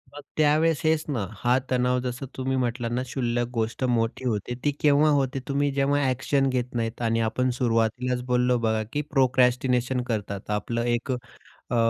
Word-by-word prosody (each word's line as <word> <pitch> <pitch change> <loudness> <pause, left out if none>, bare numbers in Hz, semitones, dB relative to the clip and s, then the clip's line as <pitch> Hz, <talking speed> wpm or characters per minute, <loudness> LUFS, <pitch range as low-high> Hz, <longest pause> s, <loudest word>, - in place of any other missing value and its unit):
मग 145 - -8 0.2
त्यावेळेस 155 +1 +3
हेच 160 0 +2
ना, 120 -9 -1
हा 125 +3 +2
तणाव 125 0 +2
जसं 125 +2 -4
तुम्ही 130 0 -1
म्हटलात 120 -1 -1
ना, 120 +1 0
शुल्लक 120 -2 -1
गोष्ट 115 +2 -2
मोठी 120 0 0
होते, 110 +1 -2
ती 145 - +2
केव्हा 150 +1 +5
होते, 135 -2 +1
तुम्ही 140 +1 +1
जेव्हा 140 +1 +2
ॲक्शन 135 +2 +1
घेत 125 -1 -2
नाहीत 115 0 -2
आणि 115 -1 +1
आपण 125 +3 0
सुरुवातीलाच 125 +1 0
बोललो 125 0 +2
बघा, 110 -1 0
की 150 - 0
प्रोक्रॅस्टिनेशन 125 -1 +2
करतात. 100 -4 -4
आपलं 115 +3 -1
एक 120 +3 -4 0.6
अ, 120 - 0
125 Hz, 165 wpm, -25 LUFS, 120-135 Hz, 0.6 s, केव्हा